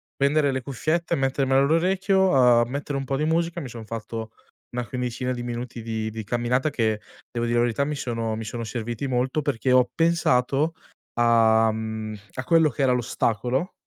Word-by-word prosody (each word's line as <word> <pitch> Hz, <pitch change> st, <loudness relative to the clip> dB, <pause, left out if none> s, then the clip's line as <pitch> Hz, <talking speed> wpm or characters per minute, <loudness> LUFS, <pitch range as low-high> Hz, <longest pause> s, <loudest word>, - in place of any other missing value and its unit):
prendere 140 Hz, 0 st, +2 dB
le 130 Hz, -, -2 dB
cuffiette 155 Hz, +6 st, -1 dB
e -, -, -3 dB
mettermele 135 Hz, 0 st, +2 dB
all'orecchio, 190 Hz, +5 st, +2 dB
uhm, 120 Hz, -4 st, +5 dB
mettere 140 Hz, +1 st, -3 dB
un 135 Hz, -, -3 dB
po' 135 Hz, +1 st, -1 dB
di 150 Hz, -, 0 dB
musica, 165 Hz, +1 st, 0 dB
mi 135 Hz, -, -6 dB
son 115 Hz, -2 st, -9 dB
fatto 115 Hz, 0 st, -6 dB, 0.4 s
una 125 Hz, -1 st, -2 dB
quindicina 125 Hz, +1 st, -3 dB
di 125 Hz, -, -3 dB
minuti 120 Hz, 0 st, -5 dB
di 110 Hz, -1 st, -3 dB
di 110 Hz, 0 st, -6 dB
camminata, 120 Hz, +6 st, 0 dB
che 110 Hz, -6 st, 0 dB, 0.3 s
devo 120 Hz, -1 st, -2 dB
dire 120 Hz, -, 0 dB
la -, -, +4 dB
verità 120 Hz, +4 st, 0 dB
mi 150 Hz, 0 st, -2 dB
sono 115 Hz, -4 st, -2 dB
mi 110 Hz, -, -5 dB
sono 115 Hz, +2 st, -5 dB
serviti 120 Hz, +3 st, -4 dB
molto, 130 Hz, +4 st, 0 dB
perché 135 Hz, -3 st, -1 dB
ho 125 Hz, -1 st, +5 dB
pensato 155 Hz, -2 st, +2 dB, 0.4 s
a, 115 Hz, -1 st, +4 dB
mhmm, 110 Hz, -1 st, -4 dB, 0.2 s
a 130 Hz, -, -3 dB
quello 160 Hz, +1 st, +4 dB
che 140 Hz, +1 st, -2 dB
era 130 Hz, -, +4 dB
l'ostacolo, 125 Hz, -, -1 dB
125 Hz, 185 wpm, -24 LUFS, 115-140 Hz, 0.4 s, uhm